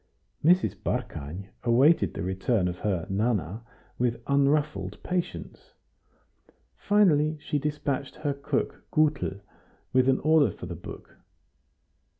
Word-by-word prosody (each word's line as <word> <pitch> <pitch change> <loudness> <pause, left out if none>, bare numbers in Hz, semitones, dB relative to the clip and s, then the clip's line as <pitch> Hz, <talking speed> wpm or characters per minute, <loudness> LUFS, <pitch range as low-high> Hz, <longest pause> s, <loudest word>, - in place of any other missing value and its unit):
Mrs. 180 +4 +4
Barkany 90 +8 -4
awaited 130 +8 +4
the - - -3
return 95 +2 0
of 90 0 -4
her 95 -5 -1
"Nana" 105 -1 -1 0.4
with 120 -1 0
unruffled 145 +2 +1
patience; 180 -1 -4 1.0
finally 155 -7 +3
she 145 0 -2
despatched 145 -2 -2
her 145 -2 -2
cook 140 0 -3
Gutel 150 -10 +1 0.5
with 130 0 +4
an 130 - +3
order 155 -1 +4
for - - -8
the 90 - -5
book. 85 - -10
135 Hz, 115 wpm, -27 LUFS, 100-150 Hz, 1.0 s, Mrs